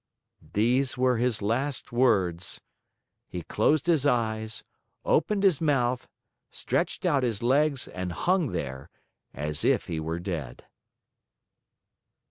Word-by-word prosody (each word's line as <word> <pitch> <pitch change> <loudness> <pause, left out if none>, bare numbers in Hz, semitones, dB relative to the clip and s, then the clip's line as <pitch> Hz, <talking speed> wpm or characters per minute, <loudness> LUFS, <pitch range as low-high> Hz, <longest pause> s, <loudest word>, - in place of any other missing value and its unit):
These 125 +5 +2
were 125 -1 +3
his 120 -3 0
last 130 +6 -1
words. 95 -8 +2 0.7
He 90 -2 -6
closed 145 - +2
his 165 -5 +3
eyes, 110 -3 0 0.4
opened 205 -2 +2
his 185 -7 +4
mouth, 130 -5 +1 0.4
stretched - - -1
out 140 -2 +3
his 115 -4 -1
legs, 140 +2 +2
and 90 -1 -5
hung 180 - +1
there, 70 -5 -5 0.4
as 75 +2 -3
if - - +2
he 80 - -3
were 80 +1 -3
dead. 85 -9 -5
120 Hz, 115 wpm, -27 LUFS, 90-135 Hz, 0.7 s, his